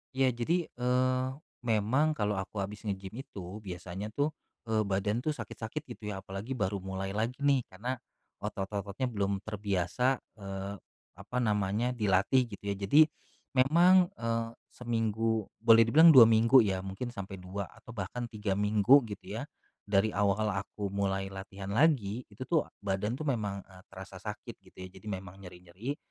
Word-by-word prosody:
Ya 130 -1 +3
jadi, 155 +9 -1
eee, 130 +1 +1 0.4
memang 120 +7 +2
kalau 105 -4 0
aku 100 +1 -4
abis 105 +2 -7
nge-gym 95 -1 -4
itu, 95 -2 -8
biasanya 95 0 -6
tuh, 145 +2 +1 0.4
eee, 110 -1 +2
badan 100 +3 0
tuh 150 +4 -1
sakit-sakit 110 0 -6
gitu 105 -1 -7
ya, 95 0 -7
apalagi 95 +7 -5
baru 100 -3 -1
mulai 95 +1 -4
lagi 115 +5 -1
nih 140 -3 +3
karena 120 +7 -4 0.4
otot-ototnya 100 +5 -3
belum 100 -2 -1
terbiasa, 105 +5 0 0.2
eee, 100 0 -5 0.4
apa 105 +6 -6
namanya, 105 +2 +1
dilatih 110 +3 +2
gitu 100 -3 -10
ya. - - -2
Jadi 100 +10 +5 0.6
memang 175 +7 +6
,eee, 115 0 -2 0.2
seminggu 115 -2 -1
boleh 115 0 +7
dibilang 160 +8 +7
2 130 -4 +11
minggu 115 +3 +6
ya, 95 -3 0
mungkin 95 +6 -4
sampai 100 -3 -6
2 95 +2 -4
atau - - -14
bahkan 115 +3 -4
3 105 -3 -2
minggu 105 +7 +5
gitu 100 - -7
ya. - - -4 0.4
Dari 100 +1 +3
awal 105 +1 +1
aku 100 +1 -4
mulai 95 -1 -1
latihan 95 0 -7
lagi, 120 -4 +3
itu 105 +4 -8
tuh 160 +3 +1
badan 100 +4 -1
tuh 155 - -4
memang, 105 -7 -1
eee, 95 -1 -16
terasa 95 0 -10
sakit 110 +3 -7
gitu 95 - -22
ya. - - -7
Jadi 110 - -13
memang 95 -1 -6
nyeri-nyeri, 90 +9 -7
105 Hz, 160 wpm, -31 LUFS, 95-125 Hz, 0.6 s, 2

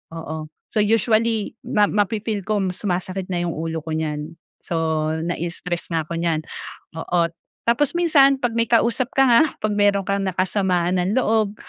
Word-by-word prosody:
Oo, 160 -1 -6 0.2
so 215 - 0
usually 220 0 +2 0.2
ma 215 -5 +3
mafi-feel 210 -1 -1
ko 210 -2 +1
sumasakit 185 0 -3
na 175 -2 -2
'yong 170 - -1
ulo 160 0 -4
ko 160 - -6
niyan. 155 +1 -3 0.2
So, 160 -2 -1
nai-stress 175 +1 -4
na 160 -2 -1
ako 170 - -4
niyan, 165 -2 0 0.6
oo. 170 +1 0 0.4
Tapos 255 +4 +3
minsan 290 -6 +5
'pag 245 -3 0
may 230 -1 +1
kausap 235 +2 +2
ka 270 - +5
nga, 235 +2 +6 0.2
'pag 215 0 -1
meron 205 -1 +3
kang 200 0 0
nakasamaan 185 -1 0
ng 190 +6 0
loob, 215 -4 +1
190 Hz, 160 wpm, -22 LUFS, 165-220 Hz, 0.6 s, nga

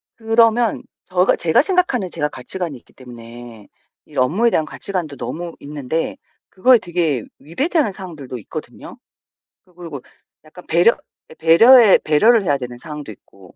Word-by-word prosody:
그러면 230 0 +2 0.2
저가 180 0 +2
제가 160 +7 +2
생각하는 320 - 0
제가 150 - -2
가치관이 170 +1 -5
있기 - - -24
때문에 120 -3 -13 0.4
이 - - -14
업무에 180 - +2
대한 160 -8 0
가치관도 170 -7 -4
너무 170 0 -6
있는데 145 +2 -4 0.3
그거에 245 +5 +4
되게 165 - -2 0.2
위배되는 275 - -1
상황들도 160 -10 -9
있거든요. 105 - -10 0.7
또 180 - -28
그리고 165 -6 -9 0.4
약간 155 +3 -15
배려 175 +8 +4 0.4
예 - - -10
배려해 210 +8 +6
배려를 215 +9 +3
해야 145 -6 +1
되는 125 -2 -8
상황도 150 -2 -9
있고 95 -2 -18
165 Hz, 345 characters per minute, -19 LUFS, 140-215 Hz, 0.7 s, 배려해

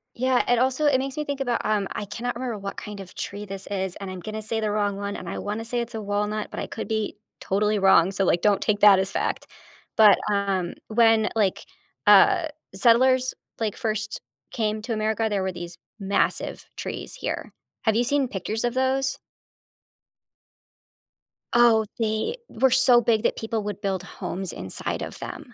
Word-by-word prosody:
Yeah. 255 +1 +2
And 245 -1 +3
also, 260 +4 +1
it 270 -3 +4
makes 270 +2 -4
me 300 - -2
think 285 -1 -3
about, 245 -3 0
um- 210 -2 +1
I 205 - -4
cannot 235 +4 -4
remember 240 -3 -3
what 195 0 -6
kind 210 -1 -7
of 190 -2 -10
tree 205 +1 -5
this 195 0 -8
is, 190 -2 -3
and 195 -2 -7
I'm 185 - -7
gonna 215 +4 -5
say 220 +1 -2
the 215 -1 -1
wrong 205 -1 0
one, 200 0 -4
and - - -7
I - - -4
wanna 215 +2 -4
say 240 +1 -2
it's 235 -1 -4
a 220 - -3
walnut, 210 +1 -2
but - - -5
I - - -3
could 225 - -6
be 220 -1 -2 0.2
totally 210 +2 +1
wrong, 190 -1 +5
so, 195 0 0
like, 175 -1 +2
don't 205 -2 +3
take 210 -1 +1
that 200 -2 +8
as 190 +1 -1
fact- - - -2 0.5
but, 215 -2 +8
um, 195 -3 0
when, 225 -1 +4
like, 200 -4 +1 0.4
uh, 360 -5 +6 0.3
settlers, 255 +4 +4 0.3
like, 215 -3 -1
first 215 -1 -3 0.3
came 215 -1 -1
to 235 -2 -2
America, 220 +1 0
there 200 -2 0
were 190 - -1
these 175 -1 -8 0.2
massive 195 0 -1
trees - - -5
here. - - -4 0.3
Have 220 -2 +2
you 240 - +3
seen 275 +1 +1
pictures 215 +2 -3
of 240 0 0
those? 265 +1 0 2.4
Oh, 230 -2 +5
they 220 - -1
were 255 +3 +2
so 250 -1 +6
big 225 -2 +2
that - - +1
people 225 -1 -2
would 205 -1 -4
build 195 -3 -2
homes 185 0 -5
inside 95 +2 -4
of - - -8
them. - - -8
215 Hz, 190 wpm, -25 LUFS, 200-240 Hz, 2.4 s, that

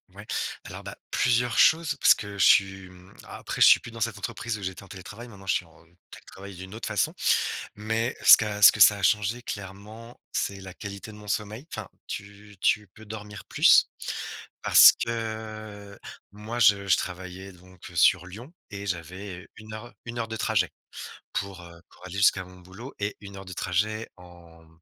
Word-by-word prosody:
Ouais. - - -11 0.4
Alors, - - -9
bah, - - -8 0.2
plusieurs 125 -1 +1
choses 160 -1 +4
parce - - +7
que 100 -1 -8
je 95 - +4
suis, 95 -1 +4
hem, 90 0 -16
après - - -7
je - - +9
suis - - +7
plus 115 - -10
dans 115 - -10
cette 110 -1 -2
entreprise 110 +2 -4
où 100 - -10
j'étais 95 +1 -5
en - - -14
télétravail, 100 +5 -10
maintenant 100 -4 -14
je - - +3
suis 90 - -2
en 80 0 -21 0.3
télétravail 100 0 -12
d'une 95 +2 -10
autre 115 - -6
façon, - - 0 0.6
mais 110 +3 -2
ce - - +12
qui - - -2
a 105 -1 -4
ce 100 - +9
que 105 - -3
ça 105 - +8
a 100 - -8
changé 105 +4 +1
clairement, 105 +4 -9
c'est 100 0 -2
la 95 -1 -10
qualité 100 +3 -8
de - - -13
mon 105 -1 -11
sommeil. 110 +6 -3
Enfin, 110 -4 -6 0.2
tu 100 0 -9
tu 105 +1 +1
peux 110 +4 -16
dormir 105 -1 -9
plus - - +5 0.7
parce - - +9
que 110 -3 -6 0.3
moi, 110 +4 -6
je 100 -2 +4
je 95 - +4
travaillais 90 +1 -6
donc, 90 0 -15
heu, 85 - -13
sur 90 +2 +4
Lyon 115 - -11 0.2
et 100 0 -7
j'avais 90 +1 -6
1 110 0 -10
heure 110 +2 -9
1 120 0 -5
heure 115 - -3
de 110 - -5
trajet 105 -5 +1 0.6
pour, 100 -2 -4
heu, 85 -1 -14
pour - - -18
aller 90 - -8
jusqu'à 100 -1 +3
mon 90 0 -15
boulot 95 +9 -11
et 100 0 -3
1 100 -1 -11
heure 95 - -9
de 95 - -10
trajet 105 +5 -2
en 85 -2 -17
100 Hz, 200 wpm, -26 LUFS, 95-110 Hz, 0.7 s, ce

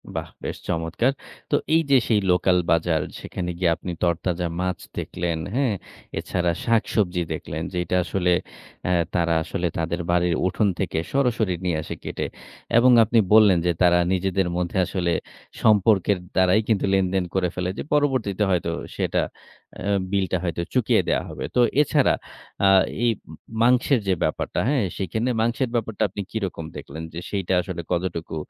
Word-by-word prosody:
বাহ! - - -3 0.2
বেশ - - -4
চমৎকার। 85 +10 0 0.4
তো - - +4 0.2
এই 165 - +5
যে 135 - +8
সেই 110 -3 +3
লোকাল 90 0 +3
বাজার 80 -1 +2 0.2
সেখানে 90 -2 -5
গিয়ে 85 -3 +3
আপনি 90 +1 -6
তরতাজা 85 +1 0
মাছ 90 0 -1 0.2
দেখলেন, 85 -2 -2 0.2
হ্যাঁ? 130 -5 +2 0.5
এছাড়া 90 -2 0
শাকসবজি 105 -6 +1
দেখলেন, 80 +2 -5
যেইটা 90 0 -1
আসলে 90 0 0 0.6
আ - - +2 0.2
তারা 85 -1 +2
আসলে 90 0 -2
তাদের 85 +2 -1
বাড়ির 90 -1 +2
উঠোন 100 +3 +1
থেকে 95 -4 -2 0.2
সরাসরি 120 -8 +1
নিয়ে 85 -3 +1
আসে - - -6
কেটে। - - -3 0.5
এবং 125 +1 +6
আপনি 115 +2 +3
বললেন 105 -5 +7
যে 90 - +3
তারা 90 0 +5
নিজেদের 95 0 0
মধ্যে 90 +1 -2
আসলে 90 -1 -1 0.5
সম্পর্কের 105 -2 +4 0.2
দ্বারাই 95 +3 +4
কিন্তু 110 -4 +2
লেনদেন 95 -1 +2
করে 90 -2 +1
ফেলে 90 0 -2
যে - - -3
পরবর্তীতে 130 -9 +1
হয়তো 85 -2 +1 0.2
সেটা - - 0 0.6
আ - - -8 0.3
বিলটা 95 -2 +1
হয়তো 85 -1 -2
চুকিয়ে - - +3
দেয়া - - +1
হবে। - - -5
তো - - +3 0.2
এছাড়া 150 -2 +3 0.5
আ - - +6 0.4
এই 120 - +4 0.5
মাংসের 125 +2 +4
যে 95 - +3
ব্যাপারটা, - - -1
হ্যাঁ? 140 -5 +2
সেখানে 110 +6 -1
মাংসের 120 +2 0
ব্যাপারটা 110 -2 -1
আপনি 100 +2 -5
কিরকম 95 -7 -3
দেখলেন? 80 +3 -8
যে 85 - -5
সেইটা 95 -2 -1
আসলে 90 -2 -5
কতটুকু 85 -2 -2
95 Hz, 155 wpm, -24 LUFS, 85-110 Hz, 0.6 s, যে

